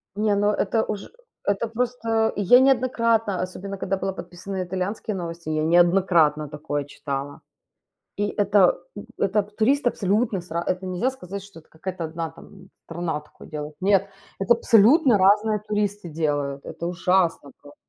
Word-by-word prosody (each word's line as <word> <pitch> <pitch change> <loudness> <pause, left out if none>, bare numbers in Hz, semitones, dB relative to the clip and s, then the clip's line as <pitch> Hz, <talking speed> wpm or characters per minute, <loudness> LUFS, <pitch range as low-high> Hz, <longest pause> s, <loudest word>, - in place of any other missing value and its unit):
Не, 210 0 +1
ну, 205 +1 +2
это 215 +2 0
уж 205 -2 -5 0.3
это 200 +3 0
просто 225 -1 0
и 205 - -2
я 245 +6 +7
неоднократно, 230 -6 +2
особенно 190 +2 -5
когда 195 0 -2
была 190 0 -3
подписана 180 +2 -7
на 185 - -1
итальянские 190 +4 -3
новости, 170 -2 -6
я 155 0 0
неоднократно 170 -3 +3
такое 145 -1 -3
читала. 140 0 -5 0.8
И 205 +1 0
это, 200 -3 +3 0.2
м, 205 - -7
это 200 +2 +2
туристы 230 +6 +1
абсолютно 205 -1 0
с 175 - -18
ра 170 +1 -1
это 185 +1 -1
нельзя 185 +7 0
сказать, 200 -7 -8
что 200 -4 -13
это 155 - -24
какая-то 180 +2 -6
1 165 0 -4
там 190 +2 -16 0.2
страна 165 -2 -3
такое 150 - -16
делает. 150 0 -6
Нет, 195 0 +3 0.3
это 195 +4 +4
абсолютно 235 +3 +5
разные 210 +3 +3
туристы 205 -2 -2
делают, 145 -3 -2
это 170 - -6
ужасно 180 -4 +1
просто. 145 0 -15
190 Hz, 160 wpm, -24 LUFS, 170-210 Hz, 0.8 s, я